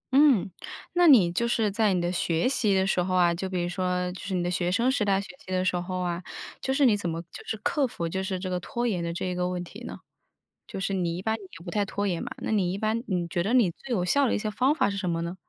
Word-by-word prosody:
嗯， 275 Hz, -11 st, +5 dB, 0.4 s
那 350 Hz, 0 st, +5 dB
你 210 Hz, -, +7 dB
就 235 Hz, +7 st, 0 dB
是 225 Hz, -3 st, +1 dB
在 215 Hz, 0 st, +2 dB
你 -, -, +1 dB
的 175 Hz, 0 st, 0 dB
学 170 Hz, +1 st, +1 dB
习 235 Hz, -6 st, +2 dB
的 190 Hz, 0 st, +3 dB
时 190 Hz, -2 st, +1 dB
候 185 Hz, +1 st, -1 dB
啊， 175 Hz, -1 st, +4 dB
就 190 Hz, +3 st, -4 dB
比 180 Hz, -2 st, -1 dB
如 175 Hz, -, -1 dB
说 180 Hz, 0 st, -1 dB
就 180 Hz, -, -9 dB
是 190 Hz, -1 st, -3 dB
你 180 Hz, -, 0 dB
的 175 Hz, -, -1 dB
学 175 Hz, 0 st, 0 dB
生 235 Hz, +6 st, +2 dB
时 265 Hz, -5 st, +1 dB
代 195 Hz, -1 st, +2 dB
学 200 Hz, -, -6 dB, 0.2 s
习 185 Hz, -, -10 dB
的 185 Hz, 0 st, +1 dB
时 180 Hz, -, +1 dB
候 180 Hz, +1 st, -3 dB
啊， 175 Hz, 0 st, -2 dB, 0.4 s
就 265 Hz, -, -1 dB
是 275 Hz, +1 st, +3 dB
你 225 Hz, -5 st, +5 dB
怎 180 Hz, -4 st, -2 dB
么 165 Hz, -, -3 dB
就 -, -, -9 dB
是 220 Hz, -, -2 dB
克 285 Hz, -4 st, +1 dB
服， 170 Hz, -7 st, -4 dB
就 190 Hz, +3 st, -2 dB
是 190 Hz, -1 st, -2 dB
这 185 Hz, -, -5 dB
个 180 Hz, -1 st, -1 dB
拖 240 Hz, +6 st, -3 dB
延 185 Hz, -8 st, 0 dB
的 170 Hz, -, -2 dB
这 180 Hz, +2 st, -3 dB
个 180 Hz, 0 st, -1 dB
问 180 Hz, -1 st, -3 dB
题 205 Hz, +7 st, -11 dB
呢？ -, -, -8 dB, 0.7 s
就 -, -, -6 dB
是 195 Hz, +1 st, -1 dB
你 175 Hz, -3 st, -1 dB
一 -, -, -5 dB
般 220 Hz, 0 st, +1 dB
也 205 Hz, -3 st, -10 dB, 0.2 s
不 175 Hz, -, -5 dB
太 205 Hz, +1 st, +1 dB
拖 200 Hz, +1 st, -3 dB
延 175 Hz, -3 st, -1 dB
嘛， -, -, -5 dB
那 -, -, -2 dB
你 190 Hz, -5 st, +2 dB
一 190 Hz, -, -3 dB
般， 220 Hz, +2 st, -1 dB
你 180 Hz, -4 st, -1 dB
觉 170 Hz, +1 st, -1 dB
得 205 Hz, +7 st, 0 dB
你 225 Hz, -9 st, +4 dB
最 260 Hz, +10 st, -11 dB
有 180 Hz, -, 0 dB
效 280 Hz, +8 st, +3 dB
的 -, -, +1 dB
一 -, -, +1 dB
些 215 Hz, 0 st, -2 dB
方 260 Hz, +7 st, +2 dB
法 310 Hz, -, +2 dB
是 200 Hz, -, -4 dB
什 185 Hz, -3 st, -2 dB
么 165 Hz, 0 st, -1 dB
呢？ 170 Hz, +2 st, -4 dB
190 Hz, 325 characters per minute, -27 LUFS, 180-220 Hz, 0.7 s, 你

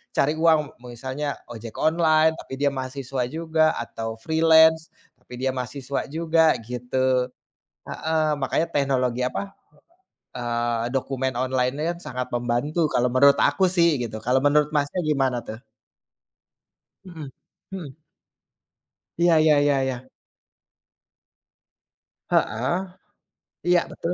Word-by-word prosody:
cari 150 Hz, +3 st, +2 dB
uang 160 Hz, -1 st, +5 dB, 0.3 s
misalnya 130 Hz, +4 st, -4 dB, 0.2 s
ojek 115 Hz, -1 st, -9 dB
online, 160 Hz, 0 st, +3 dB
tapi -, -, -10 dB
dia 140 Hz, -, +3 dB
mahasiswa 130 Hz, -1 st, -4 dB
juga 160 Hz, +2 st, +1 dB
atau 115 Hz, -1 st, -5 dB
freelance, 160 Hz, 0 st, +4 dB, 0.3 s
tapi -, -, -16 dB
dia 130 Hz, -, +1 dB
mahasiswa 130 Hz, +2 st, -4 dB
juga 160 Hz, +1 st, +2 dB
gitu. 125 Hz, +2 st, -1 dB, 0.7 s
Heeh, 160 Hz, -1 st, -1 dB
makanya 140 Hz, +4 st, 0 dB
teknologi, 130 Hz, -4 st, 0 dB
apa 130 Hz, -, -3 dB, 0.9 s
eee, 120 Hz, 0 st, -2 dB
dokumen 130 Hz, 0 st, -1 dB
online-nya 130 Hz, +6 st, -1 dB
sangat 125 Hz, 0 st, -4 dB
membantu 120 Hz, +7 st, -1 dB
kalau 125 Hz, +1 st, +2 dB
menurut 140 Hz, +3 st, +5 dB
aku 190 Hz, -, +2 dB
sih 170 Hz, -4 st, +3 dB
gitu. 110 Hz, -2 st, -5 dB
Kalau 125 Hz, +3 st, +2 dB
menurut, 150 Hz, +1 st, +3 dB
Masnya, 145 Hz, +5 st, 0 dB
gimana 135 Hz, -5 st, 0 dB
tuh? 110 Hz, +1 st, -8 dB, 1.5 s
Mhm, 160 Hz, -7 st, -9 dB, 0.4 s
mhm. 160 Hz, -5 st, -8 dB, 1.2 s
Iya 170 Hz, -1 st, +4 dB
ya 155 Hz, -2 st, +4 dB
ya 145 Hz, -, +3 dB
ya. 130 Hz, 0 st, -6 dB, 2.2 s
Heeh. 130 Hz, -, 0 dB, 0.9 s
Iya 175 Hz, -1 st, +5 dB
betul. 170 Hz, -, -4 dB
140 Hz, 110 wpm, -24 LUFS, 125-160 Hz, 2.2 s, uang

